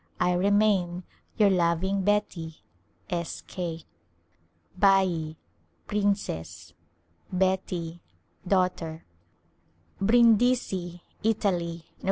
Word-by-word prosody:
I 180 Hz, 0 st, +2 dB
remain, 190 Hz, -2 st, +2 dB, 0.3 s
Your 210 Hz, -3 st, +5 dB
loving 180 Hz, +2 st, +1 dB
Beti, 185 Hz, -6 st, 0 dB, 0.5 s
S. 170 Hz, -3 st, -4 dB
K. 165 Hz, -3 st, -5 dB, 0.9 s
Bat 185 Hz, -5 st, +3 dB
— -, -, -41 dB
princess, 200 Hz, -, -2 dB, 0.6 s
Beti 180 Hz, -2 st, -1 dB, 0.2 s
— -, -, -23 dB
daughter, 180 Hz, -4 st, 0 dB, 1.0 s
Brindisi^ 220 Hz, -5 st, +3 dB, 0.2 s
Italy 200 Hz, -6 st, +1 dB
^ 170 Hz, -, -4 dB
Nov. -, -, -34 dB
185 Hz, 85 wpm, -27 LUFS, 170-200 Hz, 1.0 s, Your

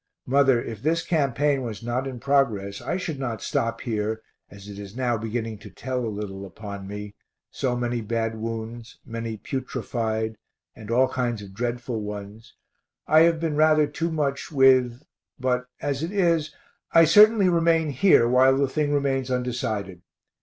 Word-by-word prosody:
Mother, 135 Hz, -1 st, +4 dB
if 115 Hz, -3 st, -6 dB
this 165 Hz, +4 st, 0 dB
campaign 145 Hz, -2 st, +1 dB
was 115 Hz, -4 st, -6 dB
not 125 Hz, +3 st, -2 dB
in 130 Hz, -2 st, -6 dB
progress 115 Hz, -8 st, 0 dB
I -, -, -2 dB
should 160 Hz, -6 st, -4 dB
not 120 Hz, -5 st, -4 dB
stop 115 Hz, 0 st, -1 dB
here, 110 Hz, -2 st, -2 dB, 0.3 s
as 100 Hz, 0 st, -13 dB
it 100 Hz, -1 st, -9 dB
is 100 Hz, +1 st, -9 dB
now 125 Hz, -2 st, 0 dB
beginning 115 Hz, 0 st, -4 dB
to -, -, -11 dB
tell 130 Hz, -1 st, -4 dB
a 115 Hz, -, -2 dB
little 100 Hz, -2 st, -6 dB
upon 100 Hz, 0 st, -8 dB
me, 105 Hz, 0 st, -7 dB, 0.4 s
so 125 Hz, -2 st, -1 dB
many 120 Hz, -1 st, -2 dB
bad 115 Hz, +1 st, -2 dB
wounds, 115 Hz, +1 st, -6 dB
many 115 Hz, -1 st, -5 dB
putrefied, 110 Hz, -3 st, -3 dB, 0.4 s
and 110 Hz, -1 st, -11 dB
all 125 Hz, +3 st, +4 dB
kinds 120 Hz, -4 st, -2 dB
of 95 Hz, -1 st, -11 dB
dreadful 120 Hz, +1 st, -3 dB
ones, 105 Hz, +2 st, -8 dB, 0.5 s
I 155 Hz, -, +5 dB
have 165 Hz, 0 st, +4 dB
been 160 Hz, -2 st, -1 dB
rather 155 Hz, 0 st, +5 dB
too 165 Hz, +3 st, -3 dB
much 145 Hz, -3 st, -2 dB
with 130 Hz, -2 st, +4 dB, 0.4 s
but 125 Hz, 0 st, 0 dB
as 140 Hz, -1 st, -2 dB
it 165 Hz, +3 st, -3 dB
is, 170 Hz, -6 st, +1 dB, 0.4 s
I 165 Hz, 0 st, +7 dB
certainly 210 Hz, +4 st, +6 dB
remain 165 Hz, -3 st, +2 dB
here 135 Hz, -4 st, +5 dB
while 130 Hz, +2 st, +5 dB
the 140 Hz, 0 st, +2 dB
thing 145 Hz, +2 st, -1 dB
remains 135 Hz, -2 st, 0 dB
undecided. 115 Hz, -7 st, -2 dB
125 Hz, 165 wpm, -25 LUFS, 110-140 Hz, 0.5 s, I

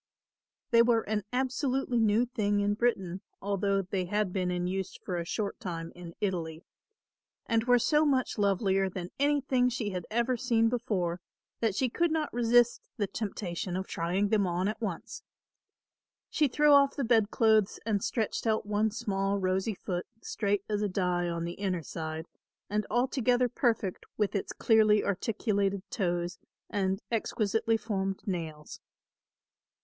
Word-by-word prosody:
They 230 Hz, -1 st, +7 dB
were 235 Hz, -1 st, +4 dB
an 210 Hz, -2 st, -2 dB
absolutely 260 Hz, 0 st, 0 dB
new 220 Hz, +2 st, +3 dB
thing 205 Hz, -4 st, 0 dB
in 205 Hz, 0 st, +2 dB
Britain, 195 Hz, -5 st, 0 dB, 0.2 s
although 200 Hz, 0 st, 0 dB
they 185 Hz, 0 st, -2 dB
had 205 Hz, 0 st, -1 dB
been 185 Hz, -2 st, 0 dB
in 180 Hz, 0 st, -1 dB
use 190 Hz, +1 st, -3 dB
for 180 Hz, -, -5 dB
a 170 Hz, -, -3 dB
short 200 Hz, +3 st, -3 dB
time 165 Hz, -2 st, -5 dB
in 175 Hz, -1 st, -10 dB
Italy, 170 Hz, -4 st, -2 dB, 0.8 s
and 230 Hz, -1 st, +1 dB
were 245 Hz, -1 st, +5 dB
so 300 Hz, +6 st, +3 dB
much 265 Hz, -6 st, +1 dB
lovelier 195 Hz, -1 st, +2 dB
than 180 Hz, -1 st, -6 dB
anything 275 Hz, -3 st, +2 dB
she 220 Hz, -4 st, -3 dB
had 180 Hz, -2 st, -5 dB
ever 235 Hz, +3 st, +1 dB
seen 230 Hz, -2 st, +2 dB
before 185 Hz, -8 st, -1 dB, 0.4 s
that 225 Hz, -4 st, +1 dB
she 260 Hz, -, +2 dB
could 340 Hz, +8 st, +1 dB
not 315 Hz, -1 st, -1 dB
resist 240 Hz, 0 st, +3 dB, 0.2 s
the 205 Hz, -, +1 dB
temptation 190 Hz, -3 st, -4 dB
of 190 Hz, -, -3 dB
trying 185 Hz, +5 st, -1 dB
them 205 Hz, -3 st, +2 dB
on 180 Hz, +2 st, 0 dB
at 215 Hz, +2 st, -3 dB
once. 195 Hz, -7 st, -4 dB, 1.1 s
She 300 Hz, -, +3 dB
threw 295 Hz, +3 st, +3 dB
off 280 Hz, -1 st, +6 dB
the 280 Hz, -, -1 dB
bedclothes 220 Hz, -2 st, +3 dB
and 210 Hz, -3 st, 0 dB
stretched 225 Hz, 0 st, -1 dB
out 220 Hz, -1 st, +1 dB
one 210 Hz, +1 st, +1 dB
small 200 Hz, -2 st, -1 dB
rosy 190 Hz, +2 st, 0 dB
foot, 180 Hz, -1 st, -4 dB, 0.2 s
straight 200 Hz, -2 st, -1 dB
as 210 Hz, -1 st, -1 dB
a 210 Hz, -, 0 dB
die 180 Hz, -2 st, 0 dB
on 170 Hz, 0 st, -2 dB
the 170 Hz, -, -4 dB
inner 185 Hz, -4 st, -1 dB
side, 160 Hz, +3 st, -5 dB, 0.5 s
and 210 Hz, 0 st, 0 dB
altogether 250 Hz, +1 st, +2 dB
perfect 235 Hz, -, -1 dB
with 210 Hz, -2 st, +1 dB
its 200 Hz, -, -2 dB
clearly 215 Hz, -2 st, +4 dB
articulated 200 Hz, -1 st, 0 dB
toes 175 Hz, -2 st, -1 dB, 0.3 s
and 195 Hz, -1 st, -1 dB
exquisitely 225 Hz, 0 st, +1 dB
formed 195 Hz, -3 st, -3 dB
nails. 160 Hz, -6 st, -5 dB
205 Hz, 155 wpm, -30 LUFS, 185-230 Hz, 1.1 s, They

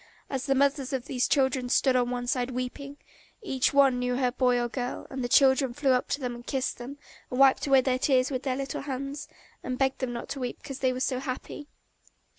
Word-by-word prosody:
And 270 Hz, -2 st, -1 dB
the 270 Hz, +1 st, 0 dB
mothers 275 Hz, 0 st, +1 dB
of 260 Hz, -1 st, -2 dB
these 255 Hz, -3 st, 0 dB
children 265 Hz, -3 st, +1 dB
stood 260 Hz, +1 st, +3 dB
on 245 Hz, -1 st, +2 dB
one 245 Hz, 0 st, -3 dB
side 250 Hz, 0 st, -1 dB
weeping; 260 Hz, +3 st, -5 dB, 0.5 s
each 265 Hz, -10 st, +1 dB
one 275 Hz, -3 st, +4 dB
knew 250 Hz, 0 st, -1 dB
her 250 Hz, -1 st, +1 dB
boy 250 Hz, -1 st, +2 dB
or 240 Hz, -, 0 dB
girl, 245 Hz, +1 st, -4 dB
and 265 Hz, -1 st, -4 dB
the 245 Hz, -, -2 dB
children 265 Hz, -1 st, +4 dB
flew 280 Hz, -1 st, +2 dB
up 250 Hz, 0 st, +1 dB
to -, -, -1 dB
them 250 Hz, -3 st, -3 dB
and 240 Hz, 0 st, -10 dB
kissed 260 Hz, 0 st, -2 dB
them 260 Hz, +4 st, -8 dB, 0.3 s
and 250 Hz, -, -3 dB
wiped 275 Hz, +1 st, +5 dB
away 270 Hz, -1 st, +6 dB
their 255 Hz, 0 st, 0 dB
tears 260 Hz, -1 st, +2 dB
with 255 Hz, -2 st, -2 dB
their 260 Hz, -2 st, -1 dB
little 275 Hz, 0 st, -4 dB
hands, 275 Hz, +1 st, -5 dB, 0.3 s
and 255 Hz, 0 st, -4 dB
begged 265 Hz, 0 st, 0 dB
them 255 Hz, -2 st, -2 dB
not 235 Hz, -1 st, -6 dB
to 280 Hz, -, -4 dB
weep 245 Hz, -2 st, -4 dB
because 270 Hz, -1 st, -8 dB
they 260 Hz, -1 st, +2 dB
were 255 Hz, 0 st, -4 dB
so 255 Hz, -1 st, 0 dB
happy. 265 Hz, +3 st, -6 dB
260 Hz, 235 wpm, -27 LUFS, 250-275 Hz, 0.5 s, away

